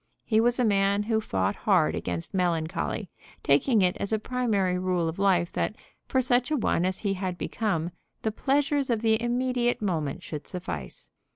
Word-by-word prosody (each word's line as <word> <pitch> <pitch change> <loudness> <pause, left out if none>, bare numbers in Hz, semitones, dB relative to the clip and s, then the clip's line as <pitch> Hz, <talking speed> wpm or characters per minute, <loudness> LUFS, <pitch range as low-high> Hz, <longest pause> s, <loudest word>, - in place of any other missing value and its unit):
He 220 -1 +3
was 240 +2 +2
a 250 - +3
man 200 -1 +2
who 220 0 +1
fought 95 - -1
hard - - +2
against 85 -1 -4
melancholy, 175 +1 -1 0.3
taking 195 - +3
it 180 -1 +2
as 200 - -3
a 220 - +3
primary 210 -6 0
rule 180 -2 0
of 160 +3 -4
life 180 -3 +3
that, 210 - -1 0.3
for 260 - +2
such 250 +1 +2
a 305 - +1
one 180 -7 +1
as 185 0 0
he 200 -2 -1
had 185 -2 -3
become, 180 -7 -1 0.3
the 220 - +1
pleasures 280 +3 +1
of 230 -2 0
the 220 0 +3
immediate 245 0 0
moment 160 -9 -2
should 150 -2 -7
suffice. 85 - -7
200 Hz, 180 wpm, -27 LUFS, 175-240 Hz, 0.3 s, He